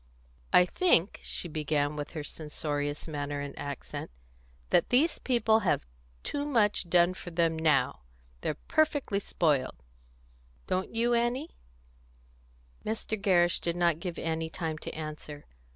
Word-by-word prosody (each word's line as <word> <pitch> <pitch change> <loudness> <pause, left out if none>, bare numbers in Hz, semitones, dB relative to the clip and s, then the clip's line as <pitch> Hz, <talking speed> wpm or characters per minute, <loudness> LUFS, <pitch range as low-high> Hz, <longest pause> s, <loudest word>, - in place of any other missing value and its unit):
"I 180 - +7
think," 195 - +3
she - - -4
began, 150 -2 0
with 145 -1 -4
her 150 - -3
censorious 145 -1 -3
manner 145 -2 -3
and 145 0 -5
accent, 140 -2 -6 0.6
"that - - +4
these 290 +7 +3
people 235 -3 +3
have 190 - +1 0.4
too 285 - -2
much 215 -10 +2
done 175 +1 +5
for 180 - -8
them 165 -1 +1
now. 150 - +2 0.4
They're 155 - -1
perfectly 290 -9 +2
spoiled. 155 -8 +1 0.9
Don't 185 +1 -1
you, 235 +1 +3
Annie?" 240 +6 0 1.3
Mr. 220 0 -2
Gerrish 180 -4 +3
did 170 -1 -1
not 170 -2 +2
give 175 -1 -5
Annie 160 0 -2
time 160 -2 -4
to - - -6
answer. 155 -1 -7
170 Hz, 135 wpm, -30 LUFS, 150-215 Hz, 1.3 s, I